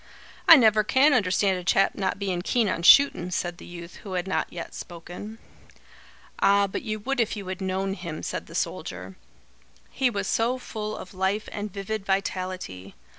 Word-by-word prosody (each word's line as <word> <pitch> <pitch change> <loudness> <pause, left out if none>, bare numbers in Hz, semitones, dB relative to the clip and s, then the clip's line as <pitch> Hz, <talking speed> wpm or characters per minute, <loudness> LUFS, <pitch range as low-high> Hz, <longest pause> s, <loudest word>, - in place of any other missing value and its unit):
"I 330 - +12
never 220 -6 +5
can 270 +7 +4
understand 190 -4 +2
a - - -8
chap 195 +2 +3
not 190 -1 -2
bein' 190 -3 -2
keen 230 +4 +1
on 170 - -1
shootin'," 180 -3 +6
said 175 -1 -3
the - - -11
youth 170 0 -10
who 195 - -9
had 180 +1 -2
not 190 - -1
yet 170 - -7
spoken. 175 +6 -9 1.0
"Ah, 200 0 +4
but 195 - -4
you 215 -3 -3
would 270 +4 -2
if 230 -2 0
you 200 - -6
had 185 +1 -5
known 190 +1 -1
him," 170 -5 -7
said - - -4
the - - -11
soldier. 90 +1 -4 0.8
"He 265 -2 +1
was 205 -3 -3
so 235 +6 +1
full 215 -4 -5
of 185 - -10
life 190 +3 -1
and 205 0 -5
vivid 200 +2 -4
vitality. 185 - -3
195 Hz, 180 wpm, -26 LUFS, 180-215 Hz, 1.0 s, I